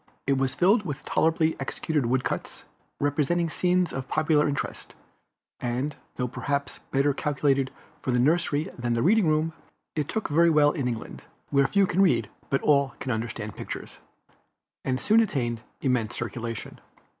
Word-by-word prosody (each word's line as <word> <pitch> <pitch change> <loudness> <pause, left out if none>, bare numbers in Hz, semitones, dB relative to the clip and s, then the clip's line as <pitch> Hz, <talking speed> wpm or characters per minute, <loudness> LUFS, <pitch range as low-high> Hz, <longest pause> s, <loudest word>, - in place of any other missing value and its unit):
It 135 -1 +2
was 135 -1 0
filled 205 +5 +4
with 150 -5 -5
tolerably 160 0 +2
executed 135 0 -1
wood 130 +1 +1
cuts, - - -4 0.4
representing 150 +4 +1
scenes 180 +2 +1
of 135 -1 -4
popular 155 0 +2
interest; 145 - -4 0.6
and 125 +4 -2 0.2
though 125 - -1
perhaps 140 +3 -3
better 140 +1 +2
calculated 140 -2 +1 0.3
for - - -5
the 125 - +3
nursery 150 +2 +2
than 120 -1 -1
the 115 - +1
reading 210 +1 +4
room, 155 +1 +1 0.4
it 150 -3 -1
took 220 - -1
very 170 +3 +4
well 150 -2 +5
in 140 -5 -2
England, 115 -2 -5 0.3
where 140 -1 +4
few 200 -1 +3
can 185 +1 +1
read 120 - +3 0.2
but 135 - 0
all 140 -2 +3
can 130 - -3
understand 110 -2 -4
pictures, - - -7 0.8
and 130 0 0
soon 215 - +4
attained 120 - 0 0.2
immense 125 -5 0
circulation. 120 -2 -5
140 Hz, 155 wpm, -26 LUFS, 125-160 Hz, 0.8 s, well